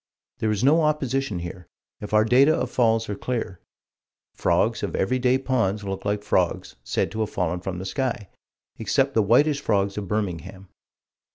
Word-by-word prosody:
There 110 - 0
is 105 0 -1
no 155 +5 +5
opposition 135 - 0
here, 85 +1 -7 0.3
if 105 - -7
our 110 0 +4
data 135 +7 +5
of - - -2
falls 115 -2 +2
are 105 - -3
clear. 100 -4 -4 0.7
Frogs - - +1
of - - -3
every 130 +7 0
day 125 +1 +3
ponds 115 -6 0
look 95 0 -5
like 105 0 -1
frogs - - 0
said - - -1
to 110 - -5
have 110 - 0
fallen 90 -1 -2
from 90 0 -5
the 95 - -6
sky 125 -1 -2 0.5
except 135 +6 +1
the 110 - +3
whitish 140 +8 +3
frogs 100 -4 0
of 100 - -6
Birmingham. 95 -2 -4
110 Hz, 175 wpm, -24 LUFS, 95-130 Hz, 0.7 s, no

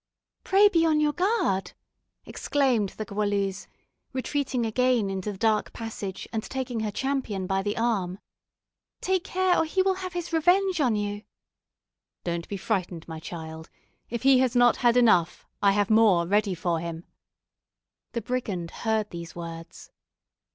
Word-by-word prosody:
"Pray 400 +2 +5
be 335 -5 +3
on 315 -2 +3
your 300 -1 +2
guard!" 355 - 0 0.5
exclaimed 255 -8 +1
the 215 - -4
Goualeuse, 200 -1 -1 0.5
retreating 260 -2 -1
again 235 -2 +1
into 195 +2 -3
the 195 - -9
dark 220 0 +1
passage, 215 -4 -6
and 220 - 0
taking 255 -1 -4
her 220 -1 -1
champion 255 -5 -2
by 195 +1 0
the 205 +1 -2
arm; 200 -6 0 0.8
"take 375 -1 0
care, 370 -1 +1
or - - +3
he 370 +4 +1
will 385 0 +2
have 370 -2 -5
his 350 -1 -5
revenge 355 +2 +3
on 245 -6 +2
you." 205 0 -2 1.0
"Don't 170 -1 -3
be 200 - -3
frightened, 180 -5 -2
my 160 -1 -6
child; 160 -1 -8 0.4
if 235 0 -4
he 265 -1 +6
has 255 -1 +1
not 245 0 +5
had 240 -1 +3
enough, 180 -9 +3 0.2
I 200 -1 +5
have 205 +1 +1
more 215 -6 +5
ready 200 +1 +1
for 170 -1 -1
him." 165 0 -6 1.1
The 235 - -2
brigand 200 -9 -3
heard 220 -2 -1
these 170 -1 -8
words. 165 -1 -9
220 Hz, 155 wpm, -26 LUFS, 190-265 Hz, 1.1 s, he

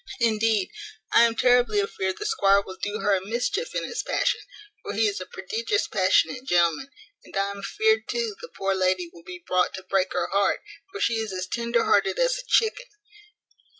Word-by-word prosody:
Indeed 220 -3 +1 0.4
I 235 - +7
am 230 -1 0
terribly 245 -3 +3
afeared 190 -1 -2
the - - -5
squire 200 0 +3
will 190 - -8
do 205 +1 -3
her 205 - +2
a 185 - -2
mischief 250 - -2
in - - -1
his - - -3
passion, - - 0 0.4
for - - -6
he - - +2
is 405 0 -3
a - - -7
prodigious 445 -3 -2
passionate 195 +6 +2
gentleman; 175 - +2 0.3
and - - -8
I 200 0 0
am 200 - -8
afeared 440 - +1
too 465 -2 -2
the 480 - -8
poor 195 0 -2
lady 185 -2 0
will 170 - -14
be 180 -1 -10
brought 185 0 +1
to 190 - -8
break 190 0 0
her - - 0
heart, 200 0 +2 0.3
for 410 - -7
she 235 - +1
is 220 -2 -3
as 185 0 -3
tender 235 +3 0
hearted 390 +3 +2
as - - +1
a - - -10
chicken. 470 +3 +2
215 Hz, 200 wpm, -25 LUFS, -, 0.4 s, I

